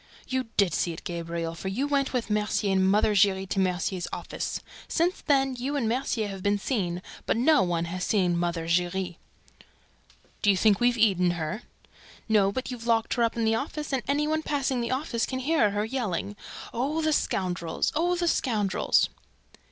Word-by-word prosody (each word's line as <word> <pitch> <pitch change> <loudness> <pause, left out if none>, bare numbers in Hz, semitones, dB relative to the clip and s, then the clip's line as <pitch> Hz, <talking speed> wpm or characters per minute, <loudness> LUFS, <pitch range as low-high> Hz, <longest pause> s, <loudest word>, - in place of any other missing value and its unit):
"You 260 -1 -1
did 195 -5 +3
see 170 - 0
it, 160 - -10
Gabriel, 170 -1 -4
for 165 - -7
you 240 +9 -1
went 280 -1 +1
with 245 -4 -2
Mercier 210 -1 +1
and 190 0 +3
Mother 210 +1 +3
Giry 195 -1 +3
to 195 - -2
Mercier's 185 -1 0
office. - - -4 0.3
Since 345 +2 0
then, 270 -3 +2
you 275 +4 -2
and 255 -6 0
Mercier 235 -2 0
have 195 -1 -7
been 205 +1 +2
seen, 185 -6 -2 0.2
but - - +2
no 295 +5 +5
one 170 -2 0
has 180 +2 -4
seen 180 -4 +2
Mother 170 -1 -1
Giry." 175 +1 0 1.2
"Do 205 - +3
you 195 - +5
think 205 0 +4
we've 240 0 +3
eaten 185 -6 +3
her?" 170 +8 -3 0.7
"No, 205 -3 +4
but 260 +5 -4
you've 235 -2 -7
locked 225 -1 +2
her 240 - -1
up 230 0 +1
in 230 - +1
the 220 - +3
office; 295 +4 -3
and 265 - +1
any 290 +2 +1
one 315 +1 0
passing 275 -5 -1
the 235 - -2
office 255 -3 -1
can 260 - -3
hear 260 -4 +2
her 205 +1 -1
yelling, 215 -5 -2 0.4
'Oh, 290 +7 -1
the 310 0 +2
scoundrels! 175 - -1
Oh, 345 +4 +1
the 345 0 -1
scoundrels!'" 215 - +2
215 Hz, 190 wpm, -27 LUFS, 185-260 Hz, 1.2 s, no